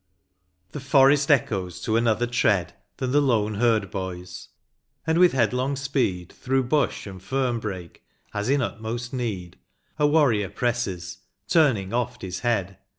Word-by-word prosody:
The - - -6
forest 140 +1 +4
echoes 100 - +1
to 110 - -1
another 115 0 +2
tread 110 -7 +1 0.2
Than 130 -1 -2
the 145 +2 +4
lone 110 -6 +1
herd 110 -3 +1
hoys, 90 -1 -6 0.6
and 160 +1 +2
with 180 -1 +6
headlong 130 +2 +1
speed, 130 -10 -1
Through 130 -1 -1
hush 150 -2 +1
and 95 -3 -9
fern 125 +1 -1
hrake, 95 -5 -6 0.4
as 105 +3 -2
in 140 0 +2
utmost 115 +3 -5
need, 105 -9 -4 0.4
A 150 - +4
warrior 130 - +3
presses, 95 -8 -3 0.3
turning 130 - +2
oft 125 0 -2
his 95 0 -4
head. 100 -6 -1
120 Hz, 145 wpm, -24 LUFS, 95-135 Hz, 0.6 s, with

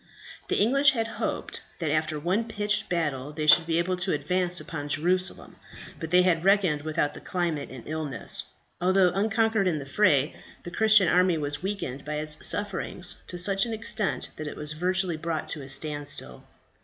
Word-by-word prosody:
The - - 0
English 275 +7 +5
had 225 -3 -1 0.2
hoped - - -3 0.2
that 160 -4 -2
after 155 0 0
one 185 +9 0
pitched 210 -2 -1
battle 150 -5 -1
they 155 0 -3
should 165 +2 +7
be 165 -1 +1
able 180 +2 0
to 185 +1 0
advance 175 +4 0
upon 145 -3 -6
Jerusalem, 180 +5 0 0.4
but 160 - -5
they 180 +2 +5
had 170 -3 +2
reckoned 190 -6 +3
without 155 -1 -1
the - - -10
climate 170 -5 -2
and 130 -3 -10
illness. 155 -5 -3 0.4
Although 185 0 +4
unconquered 220 +1 +1
in 170 -4 +1
the 140 - -6
fray, 145 -3 +2 0.3
the 175 - -7
Christian 215 0 +5
army 180 -1 +3
was 145 -1 -3
weakened 185 -9 -4
by 150 0 -4
its 150 0 -1
sufferings 190 -3 -2
to 180 - -6
such 195 +4 +1
an 230 - -4
extent 215 -4 -2
that 155 - -5
it - - -7
was 150 0 -5
virtually 180 +1 -1
brought 160 0 -3
to 155 - -3
a 135 - -9
standstill. 145 - -4
175 Hz, 180 wpm, -27 LUFS, 150-195 Hz, 0.4 s, should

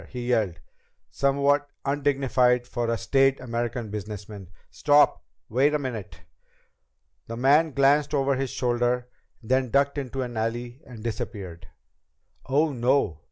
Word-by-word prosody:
he 125 -1 -6
yelled, 100 -9 +1 0.5
somewhat 140 +1 +1 0.2
undignified 135 -3 +2
for 120 -1 -3
a 115 - 0
staid 135 +5 +2
American 120 -2 -3
businessman. 105 -2 -7 0.2
"Stop! 145 0 +3 0.3
Wait 140 +6 +2
a - - +3
minute!" 110 - -6 1.1
The 115 - -6
man 145 +6 +4
glanced 140 +2 +3
once - - +3
over 135 0 +1
his 135 0 -2
shoulder, 120 0 0 0.3
then 130 +2 +1
ducked 140 +3 +2
into 135 -1 -4
an 120 -2 -6
alley 120 +4 -3
and 115 -4 -11
disappeared. 95 -6 -6 0.8
"Oh, 145 +3 +2
no!" 125 - +1
125 Hz, 130 wpm, -25 LUFS, 115-140 Hz, 1.1 s, man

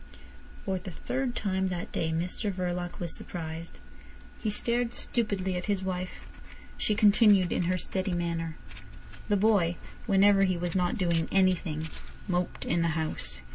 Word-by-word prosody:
For 190 -1 -1
the 185 - -7
third 250 +7 -3
time 190 -2 0
that 180 -1 -4
day 160 - -1
Mr 180 +6 -1
Verloc 180 -1 -3
was 170 -2 0
surprised. 165 - -6 0.6
He 215 - 0
stared 235 +3 +1
stupidly 200 -5 0
at 180 - -4
his 200 -2 0
wife. 185 -1 -4 0.5
She 210 - 0
continued 205 -3 +5
in 180 - +1
her 185 +1 +1
steady 185 +1 -2
manner. 165 -2 -2 0.7
The 205 - +3
boy, 190 -5 +3 0.3
whenever 195 0 +5
he 185 -2 +2
was 175 0 -2
not 180 -1 +1
doing 170 -4 +1
anything, 180 -5 +2 0.4
moped 180 -1 -1
in 170 +1 +1
the 170 - +2
house. 160 -1 -3
185 Hz, 150 wpm, -29 LUFS, 170-200 Hz, 0.7 s, continued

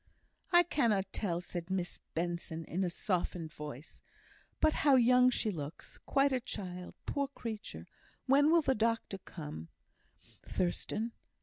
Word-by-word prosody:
"I 350 0 +8
cannot 230 - +1
tell," 175 -5 -1
said 175 0 -6
Miss 185 -2 -2 0.2
Benson, 170 -1 -2
in 185 +3 -1
a 180 - +1
softened 175 -3 -2
voice. 150 -1 -8 0.6
"But 310 - +4
how 285 -2 +6
young 250 0 +6
she 225 -3 0
looks! 150 -3 -7
Quite 275 0 +4
a 260 - +2
child, 180 -6 -6
poor 280 -1 0
creature! 230 -6 -6 0.4
When 280 +3 +5
will 335 0 +5
the 270 - +3
doctor 230 -3 0
come, 150 - -8 0.8
Thurstan? 210 +5 -1
200 Hz, 135 wpm, -33 LUFS, 175-255 Hz, 0.8 s, I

